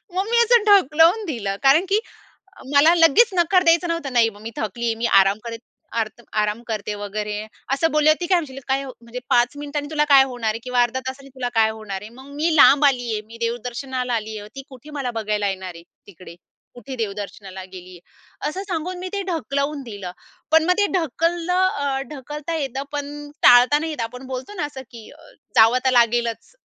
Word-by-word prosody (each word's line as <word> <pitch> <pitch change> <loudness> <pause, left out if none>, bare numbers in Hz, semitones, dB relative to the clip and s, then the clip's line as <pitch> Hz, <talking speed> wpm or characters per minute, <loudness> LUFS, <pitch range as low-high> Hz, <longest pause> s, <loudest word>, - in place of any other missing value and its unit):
मग 380 +1 0
मी 475 - +2
असं 470 -1 +4
ढकलून 340 +3 +4
दिलं. 205 - -3
कारण 280 +7 +5
की 405 +3 +2 0.7
मला 310 +4 +6
लगेच 350 +8 +5
नकार 360 +1 +3
द्यायचं 335 +1 +3
नव्हतं 335 -5 -3
नाही 235 -2 +4
मग 205 -1 -16
"मी 225 - -6
थकलीये 230 +2 -2
मी 230 +1 -2
आराम 195 0 +4
करेत 230 -1 -6 0.4
आर्त 220 +1 -5 0.2
आराम 210 +2 -1
करते 210 -2 -3
वगैरे" 210 +1 -4
eeअसं 275 +8 -2
बोलली. 305 0 +5
ती 350 - -2
काय 365 0 +3
म्हणशील 270 -5 -6
काय 270 +1 0
म्हणजे 240 -2 -9
5 245 +4 +3
मिनिटांनी 290 0 -5
तुला 300 -1 +1
काय 275 -1 +9
होणार 240 -3 -3
आहे 215 - -4
किंवा 250 -1 +2
अर्ध्या 240 +2 -1
तासाने 275 +1 -8
तुला 250 -2 -3
काय 220 -1 +3
होणार 200 -3 -6
आहे. 210 - -9
मग 265 +1 -13
मी 315 +2 0
लांब 290 +1 +7
आली 245 -4 0
आहे 215 - -2
मी 230 +1 -13
देवदर्शनाला 245 +2 -3
आली 220 -1 -4
आहे 205 0 -10
ती 270 - -6
कुठे 265 +3 -13
मला 250 -2 -2
बघायला 210 -1 -1
येणार 190 -2 -5
आहे 170 - -12 0.3
तिकडे 180 -3 -13 0.4
कुठे 245 +2 -9
देवदर्शनाला 200 -3 -6
गेली 185 -1 -10
आहे. 180 +10 -10
असं 370 +6 -5
सांगून 355 +1 -3
मी 370 +1 -5
ते 400 -1 -2
ढकलवून 290 -3 -2
दिलं 205 -7 -7 0.4
पण 320 0 +5
मग 360 +2 +3
ते 410 - +4
ढकललं, 335 -3 0
ढकलता 295 +3 -6
येतं 270 -3 -3
पण 290 0 -6
टाळता 245 +4 +7
नाही 320 +1 -4
येतं. 295 - -4
आपण 250 +3 -9
बोलतो 260 +10 -6
ना 355 - -3
असं 270 -2 -9
की 230 -2 -11
अ, - - -17 0.4
जावं 225 +2 +6
तर 260 - +4
लागेलच 235 - +1
260 Hz, 200 wpm, -21 LUFS, 225-310 Hz, 0.7 s, काय